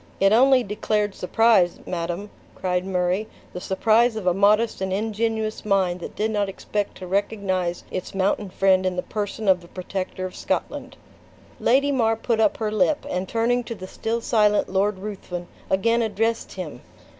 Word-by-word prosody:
"It 195 +2 +4
only 260 +2 +5
declared 210 0 -1
surprise, 195 -2 +3
madam," 175 +3 -4 0.2
cried 180 0 -1
Murray, 185 +3 0 0.3
"the 180 - -6
surprise 220 +5 +3
of 215 -4 -5
a 180 - +4
modest 210 +3 +3
and 190 0 -1
ingenuous 220 +2 -1
mind 190 -3 +1
that - - -8
did 220 +1 0
not 205 -2 0
expect 205 +1 -3
to 185 - -8
recognize 190 -2 -1
its 185 +1 -5
mountain 195 +1 0
friend 190 0 +3
in 185 -1 0
the 180 - -2
person 210 0 -4
of 185 -2 +4
the 170 - -14
protector 185 +1 -5
of 185 - -7
Scotland." - - -3 0.6
Lady 280 +4 +3
mar 225 -4 +2
put 225 0 -1
up 210 -2 +3
her 215 -2 -2
lip, 215 +8 +1
and 180 +1 -2
turning 240 +2 +1
to 230 - -6
the 185 -2 -8
still 225 +4 -3
silent 210 -3 +2
Lord 195 +1 +1
Ruthven, 185 -3 -6 0.2
again 230 +5 +2
addressed 225 +1 -1
him. 160 -9 -7
205 Hz, 170 wpm, -23 LUFS, 185-225 Hz, 0.6 s, only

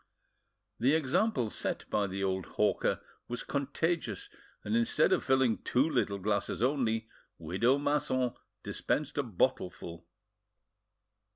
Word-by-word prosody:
The 130 +6 +4
example 160 - +1
set - - -2
by 105 -1 +2
the 95 +1 -3
old 95 -2 -1
hawker - - +2 0.3
was 120 - -4
contagious, 165 - -1 0.3
and 225 - -1
instead 235 +1 +3
of - - +1
filling 130 -4 +3
two 130 +5 +2
little 100 -10 0
glasses 100 +2 -1
only, 115 -5 +1 0.3
widow 95 - +2
Masson 140 -4 +1 0.3
dispensed 150 -1 -1
a - - +2
bottleful. 90 -6 -2
125 Hz, 115 wpm, -31 LUFS, 100-145 Hz, 0.3 s, The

